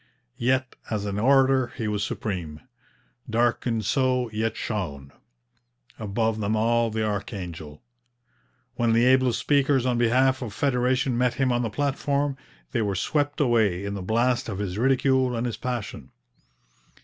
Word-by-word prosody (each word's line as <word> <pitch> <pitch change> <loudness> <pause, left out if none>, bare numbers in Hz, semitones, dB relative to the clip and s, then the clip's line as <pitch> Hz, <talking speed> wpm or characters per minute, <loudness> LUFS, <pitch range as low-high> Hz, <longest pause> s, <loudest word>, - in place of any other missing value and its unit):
Yet 130 +1 0
as 105 -2 -2
an 100 0 -2
orator 135 +1 +4
he 110 -4 -2
was 105 -1 -1
supreme. 90 -9 -4 0.7
Darkened 115 -1 0
so, 130 -2 +1
yet 110 0 -2
shone 70 -11 -4 0.9
Above 110 +1 -1
them 105 +1 0
all 115 +1 +2
the 110 0 -1
archangel. 90 -7 -5 0.9
When 115 -1 +2
the 115 +2 +4
ablest 130 -1 +4
speakers 140 -3 +2
on 125 -2 +1
behalf 130 +3 +3
of 115 -5 -6
federation 130 -1 +1
met 125 0 +1
him 135 -2 +1
on 120 0 +1
the 115 - -1
platform, 140 +2 -1 0.4
they 120 - 0
were 100 -2 -1
swept 145 +9 -1
away 110 -9 +2
in 100 - -3
the 100 - -5
blast 120 +5 +1
of 95 - -4
his 95 -3 -3
ridicule 130 0 +2
and 115 +1 -2
his 120 - -3
passion. 105 - -5
120 Hz, 150 wpm, -25 LUFS, 105-130 Hz, 0.9 s, orator